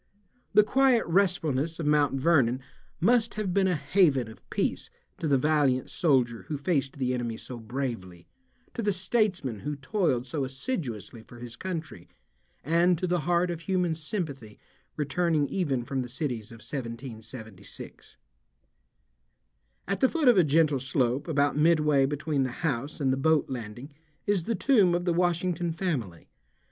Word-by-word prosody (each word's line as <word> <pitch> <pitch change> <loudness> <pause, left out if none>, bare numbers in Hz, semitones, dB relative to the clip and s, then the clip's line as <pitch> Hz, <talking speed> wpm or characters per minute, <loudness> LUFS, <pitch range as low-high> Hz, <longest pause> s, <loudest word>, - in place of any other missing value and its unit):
The 210 - +8
quiet 260 +1 +3
restfulness 165 -4 +1
of 165 - -2
Mt. 150 -2 +3
Vernon 135 -4 +3 0.4
must 230 +4 +2
have 210 -4 -2
been 195 0 +3
a 180 - +2
haven 150 - +2
of - - -18
peace - - -2 0.3
to 160 - -2
the 140 -2 +4
valiant 140 -2 +1
soldier 125 - +1
who 150 - -3
faced 140 -3 -1
the 125 -2 0
enemy 120 -2 -3
so 125 0 -8
bravely, 110 -8 -5 0.5
to - - -3
the 205 -2 +1
statesman 185 - 0
who 145 +5 -4
toiled 140 - 0
so 140 +2 -3
assiduously 130 - -4
for 120 +2 -14
his 120 -1 -9
country, 160 - -6 0.5
and 170 +4 +3
to 185 - -2
the 180 0 +1
heart 175 0 +2
of 170 - -4
human 180 -1 0
sympathy 155 - -5 0.4
returning 150 +1 +1
even 140 -10 -1
from 135 +1 -2
the 125 - -6
cities 125 -4 -4
of 115 -1 -12
1776. 115 -4 -8 1.7
At 195 +2 -1
the 260 - +4
foot 320 -5 0
of 245 - +8
a 185 - +6
gentle 150 -2 +3
slope 130 +2 0
about 145 -3 +1
midway 150 -3 +4
between 145 0 -1
the 130 - 0
house 145 -2 -3
and 135 -3 +2
the - - -1
boat 155 0 +2
landing 120 +3 -7 0.3
is 200 -5 +1
the 230 +1 0
tomb 200 -5 +4
of 175 0 -2
the 175 - +2
Washington 175 0 0
family. 145 - -3
150 Hz, 155 wpm, -28 LUFS, 130-175 Hz, 1.7 s, The